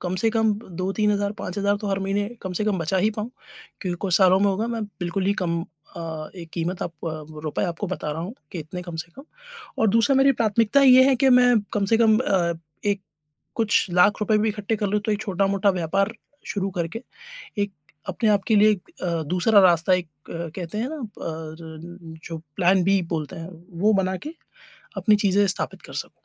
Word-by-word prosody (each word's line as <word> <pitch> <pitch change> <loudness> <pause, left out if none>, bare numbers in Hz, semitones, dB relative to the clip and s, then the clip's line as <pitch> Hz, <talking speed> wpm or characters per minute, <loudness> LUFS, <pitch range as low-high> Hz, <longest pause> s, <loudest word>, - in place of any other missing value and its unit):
कम 180 0 -2
से 225 +1 +2
कम 220 -1 +2
ब 220 - -14
2-3,000 200 +2 0
5,000 200 +2 0
तो 210 - -3
हर 195 0 0
महीने 205 +1 0
कम 185 - -4
से 210 - 0
कम 205 -4 0
बचा 165 +3 -1
ही 210 +4 +3
पाऊँ। 215 +3 -4 0.5
क्योंकि 180 -3 -3
कुछ 185 -4 +3
सालों 185 -1 +5
में 205 - +4
होगा, 200 +3 0
मैं 230 -1 -3
बिल्कुल 190 -1 -3
ही 200 - +3
कम 170 -1 0 0.4
अ, 160 -2 -6
एक 170 -2 -9
कीमत 175 +2 -3
आप - - -4 0.5
रुपए 155 - -1
आपको 175 +3 -3
बता 175 -4 -4
रहा 160 - -5
हूँ 195 +7 -6 0.2
कि 180 - -5
इतने 170 +3 -6
कम 175 -2 -7
से 165 +1 -6
कम। 275 - -11 0.5
और 220 - +3
दूसरा 230 +6 +3
मेरी 275 +1 +5
प्राथमिकता 225 +5 +3
ये 260 -1 +8
है 265 - +4
कि 265 +1 +3
मैं 245 -1 +5 0.2
कम 205 - +1
से - - +7
कम 220 -2 +5
अ, 185 -8 +1 0.3
एक 200 -1 +1 0.5
कुछ 220 -2 +2
लाख 180 +5 +4
रुपए 210 0 +2
भी 220 +1 +1
इकट्ठे 210 +1 -2
कर 205 0 -1
लूँ, 210 +2 0
तो 215 +1 -1
एक 205 - -2
छोटा-मोटा 195 0 +1
व्यापार 195 +4 0 0.4
शुरू 195 -1 -2
करके, 170 +8 -3 0.6
एक 200 - -1 0.4
अपने 215 +4 +1
आप 200 -2 +3
के 220 - +4
लिए 215 +1 +6
एक 200 -4 -4
अ, 170 -2 -1
दूसरा 190 +4 +4
रास्ता 175 0 +4
एक 180 -2 0 0.2
अ, 170 -1 -5
कहते 180 +1 -5
हैं 235 +4 -1
ना, 310 -1 -6 0.2
पर 160 +1 -8
जो 165 -1 -5 0.2
प्लान 185 +1 +3
बी 195 +1 +3
बोलते 155 +3 -5
हैं, 165 +2 -7 0.3
वो 215 +1 +4
बनाके 190 +11 -3 0.7
अपनी 215 -2 +4
चीज़ें 200 0 +3
स्थापित 195 - -3
कर - - -12
सकूँ। - - -4
195 Hz, 210 wpm, -24 LUFS, 175-215 Hz, 0.7 s, ये